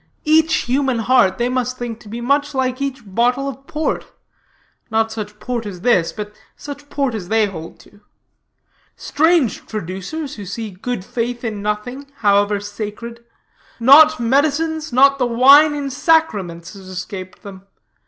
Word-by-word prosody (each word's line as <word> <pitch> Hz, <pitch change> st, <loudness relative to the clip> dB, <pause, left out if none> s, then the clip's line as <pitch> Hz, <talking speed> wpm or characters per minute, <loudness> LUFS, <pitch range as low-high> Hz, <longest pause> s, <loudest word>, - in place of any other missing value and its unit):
Each 315 Hz, 0 st, +3 dB
human 260 Hz, 0 st, 0 dB
heart 230 Hz, -3 st, +3 dB
they 240 Hz, -, 0 dB
must 255 Hz, 0 st, -2 dB
think 235 Hz, -2 st, -5 dB
to 215 Hz, -, -14 dB
be 230 Hz, +3 st, -6 dB
much 285 Hz, +3 st, 0 dB
like 255 Hz, 0 st, -1 dB
each 270 Hz, -2 st, -3 dB
bottle 245 Hz, +7 st, 0 dB
of 275 Hz, 0 st, -8 dB
port, 305 Hz, +1 st, -2 dB, 0.8 s
not 225 Hz, 0 st, +1 dB
such 210 Hz, -1 st, -7 dB
port 240 Hz, -3 st, -4 dB
as 185 Hz, -3 st, -8 dB
this, 185 Hz, -7 st, +2 dB
but 210 Hz, -1 st, -7 dB, 0.2 s
such 290 Hz, 0 st, -10 dB
port 275 Hz, -4 st, -1 dB
as 200 Hz, -5 st, -5 dB
they 220 Hz, +2 st, +2 dB
hold 165 Hz, -5 st, -8 dB
to. 205 Hz, -, -21 dB, 0.9 s
Strange 315 Hz, -, +1 dB
traducers, 215 Hz, -, -6 dB
who 205 Hz, -, -7 dB
see 215 Hz, +2 st, -5 dB
good 190 Hz, +1 st, -5 dB
faith 240 Hz, +2 st, -3 dB
in 215 Hz, -3 st, -4 dB
nothing, 210 Hz, +7 st, -4 dB
however 205 Hz, 0 st, +2 dB
sacred. 215 Hz, +3 st, -7 dB, 0.6 s
Not 300 Hz, +6 st, +7 dB
medicines, 305 Hz, +5 st, 0 dB
not 275 Hz, +2 st, +4 dB
the 250 Hz, -, +2 dB
wine 280 Hz, +6 st, +6 dB
in 280 Hz, -2 st, -4 dB
sacraments, 210 Hz, -, 0 dB
has 195 Hz, -2 st, -12 dB
escaped 185 Hz, +1 st, -8 dB
them. 195 Hz, -1 st, -11 dB
240 Hz, 155 wpm, -19 LUFS, 205-275 Hz, 0.9 s, Not